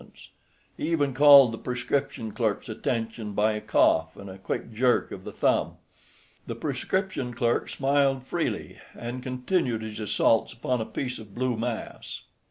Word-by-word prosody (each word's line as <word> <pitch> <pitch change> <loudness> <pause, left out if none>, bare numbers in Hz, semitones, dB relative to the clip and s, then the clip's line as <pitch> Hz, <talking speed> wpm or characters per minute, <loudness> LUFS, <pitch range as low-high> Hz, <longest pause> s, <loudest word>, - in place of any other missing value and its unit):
He 155 - -2
even 145 -5 +1
called 140 -2 +8
the 115 - -6
prescription 125 -2 -2
clerk's 110 -1 -1
attention 115 -1 -3
by 105 +2 +2
a 105 - -4
cough 80 0 +2
and 100 -1 -9
a 95 - -11
quick 105 +4 -4
jerk 125 +2 +2
of - - -8
the - - -7
thumb. - - +1 0.7
The - - -4
prescription 185 -11 -2
clerk 120 -1 0
smiled 135 -1 +1
freely, - - -3 0.2
and 120 +2 -5
continued 125 -2 -1
his 110 0 -6
assaults 110 +1 +2
upon 125 0 -1
a - - -2
piece 125 -2 -4
of 105 -3 -13
blue 130 -1 0
mass. 115 0 -5
120 Hz, 155 wpm, -26 LUFS, 110-135 Hz, 0.7 s, called